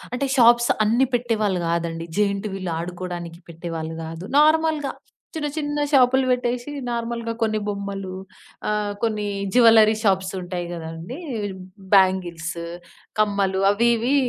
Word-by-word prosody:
అంటే 275 +2 -1
షాప్స్ 235 0 +6 0.2
అన్నీ 240 +5 +3
పెట్టేవాళ్ళు 215 -6 0
గాదండి. 165 0 -2
జయింట్ 200 0 0
వీల్ 185 -3 -4
ఆడుకోవడానికి 175 -1 -6
పెట్టేవాళ్ళు 165 -1 -5
గాదు. 165 +2 -7
నార్మల్‌గా 310 -1 +3 0.4
చిన్న 300 -2 -2
చిన్న 295 -1 -2
షాపులు 265 -1 +5
పెట్టేశి 250 +1 -1 0.2
నార్మల్‌గా 235 0 -3
కొన్ని 215 -1 +1
బొమ్మలు 200 -2 -4 0.6
ఆహ్, 210 -1 -1
కొన్ని 215 -2 0 0.3
జ్యువెల్లరీ 225 -3 +7
షాప్స్ 190 -2 +2
ఉంటాయి 175 -1 -4
గదండీ! 165 - -7 0.8
బ్యాంగిల్స్, 180 -4 +2 0.6
కమ్మలు 200 -2 +1
అవి 225 +4 +3
ఇవీ 245 +5 +1
205 Hz, 120 wpm, -23 LUFS, 180-240 Hz, 0.8 s, జ్యువెల్లరీ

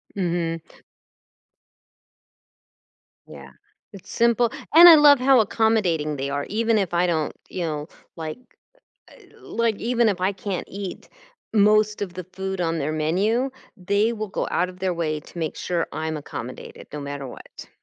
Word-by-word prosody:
Mhm. 170 -3 -1 2.7
Yeah. - - -12 0.4
It's 195 - -12
simple, 235 0 +2 0.2
and 340 +3 +11
I 330 - +11
love 290 -3 +7
how 265 0 +5
accommodating 195 -9 +1
they 135 +1 -3
are, 145 0 -2
even 225 +1 +1
if 190 -4 -1
I 175 +1 +2
don't, 160 -3 -1 0.2
you 185 - -5
know, 155 -2 -3 0.3
like 160 +2 -6 0.7
uh, - - -18 0.2
like, 230 -3 -1
even 235 0 +1
if 195 -3 0
I 190 +2 +1
can't 195 -1 -5
eat 195 -1 -7 0.4
most 215 0 +3
of 185 -3 -5
the 185 0 -6
food 190 -1 -4
on 165 -1 -1
their 155 +1 -2
menu, 195 - 0 0.3
they 200 +4 +1
will 215 -1 -5
go 195 - -3
out 180 +1 +1
of 180 - -16
their 185 -1 -1
way 155 -2 -2
to 170 - -13
make 160 -2 -3
sure 175 -2 -2
I'm 160 0 -3
accommodated 130 -4 -8
no 150 - -5
matter 140 -1 -6
what. 125 - -12
185 Hz, 160 wpm, -23 LUFS, 160-215 Hz, 2.7 s, and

